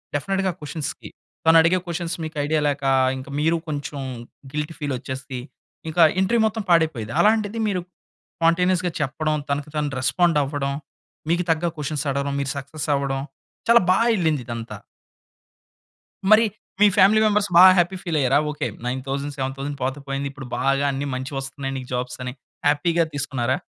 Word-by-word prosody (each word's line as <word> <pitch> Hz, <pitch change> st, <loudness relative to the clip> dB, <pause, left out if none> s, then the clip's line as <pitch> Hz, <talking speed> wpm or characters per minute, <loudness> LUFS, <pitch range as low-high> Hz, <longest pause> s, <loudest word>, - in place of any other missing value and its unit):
డెఫినిట్‌గా 195 Hz, +5 st, 0 dB
క్వెషన్స్‌కి 150 Hz, 0 st, -6 dB, 0.4 s
తనడిగే 165 Hz, +2 st, +6 dB
క్వెషన్స్ 170 Hz, 0 st, -3 dB
మీకు 155 Hz, -1 st, -6 dB
ఐడియా 155 Hz, 0 st, +1 dB
లేక, 145 Hz, -1 st, -2 dB, 0.3 s
ఇంకా 130 Hz, +1 st, -9 dB
మీరు 160 Hz, +2 st, +2 dB
కొంచెం 145 Hz, -1 st, -4 dB, 0.5 s
గిల్టీ 150 Hz, +2 st, -3 dB
ఫీల్ 145 Hz, -3 st, -2 dB
వచ్చేసి, 130 Hz, +1 st, -6 dB, 0.5 s
ఇంకా 165 Hz, +2 st, +1 dB, 0.2 s
ఇంటర్వ్యూ 225 Hz, +5 st, +2 dB
మొత్తం 220 Hz, 0 st, -3 dB
పాడైపోయేది. 155 Hz, -10 st, +2 dB
అలాంటిది 215 Hz, +1 st, +2 dB
మీరు 185 Hz, -3 st, -1 dB, 0.6 s
స్పాంటేనియస్‌గా 180 Hz, +2 st, +2 dB
చెప్పడం, 155 Hz, +2 st, -1 dB
తనకు 145 Hz, +1 st, -2 dB
తాను 150 Hz, -1 st, -1 dB
రెస్పాండ్ 160 Hz, +5 st, +2 dB
అవ్వడం, 140 Hz, 0 st, -2 dB, 0.6 s
మీకు 175 Hz, +1 st, +2 dB
తగ్గ 165 Hz, +1 st, 0 dB
క్వెషన్స్ 150 Hz, 0 st, -3 dB
అడగడం, 140 Hz, 0 st, -1 dB
మీరు 140 Hz, -, -2 dB
సక్సెస్ 145 Hz, +3 st, -6 dB
అవ్వడం, 135 Hz, -1 st, -1 dB, 0.5 s
చాలా 235 Hz, -2 st, +7 dB
బాగా 230 Hz, +5 st, +3 dB
వెళ్ళింది 160 Hz, -, 0 dB
ఇదంతా. 115 Hz, -1 st, -5 dB, 1.6 s
మరి 215 Hz, +1 st, +7 dB, 0.4 s
మీ 210 Hz, -, +8 dB
ఫ్యామిలీ 210 Hz, +3 st, +6 dB
మెంబర్స్ 210 Hz, -1 st, +2 dB
బాగా 185 Hz, +1 st, +10 dB
హ్యాపీ 175 Hz, +2 st, +2 dB
ఫీల్ 165 Hz, -4 st, -1 dB
అయ్యారా. 135 Hz, +1 st, +3 dB
ఓకే 150 Hz, -, -3 dB, 0.2 s
9000, 135 Hz, +3 st, -3 dB
7000 135 Hz, +2 st, -4 dB
పోతే 135 Hz, +2 st, -2 dB
పోయింది. 140 Hz, 0 st, -2 dB
ఇప్పుడు 135 Hz, -2 st, -9 dB
బాగా 135 Hz, +1 st, +1 dB
అన్ని 140 Hz, +1 st, -3 dB
మంచివొస్తున్నాయి 135 Hz, +1 st, -4 dB
నీకు 130 Hz, -1 st, -8 dB
జాబ్స్ 125 Hz, 0 st, -3 dB
అని 125 Hz, -, -4 dB, 0.3 s
హ్యాపీగా 165 Hz, +4 st, +3 dB
తీసుకున్నారా? 135 Hz, -3 st, -1 dB
150 Hz, 145 wpm, -23 LUFS, 135-175 Hz, 1.6 s, బాగా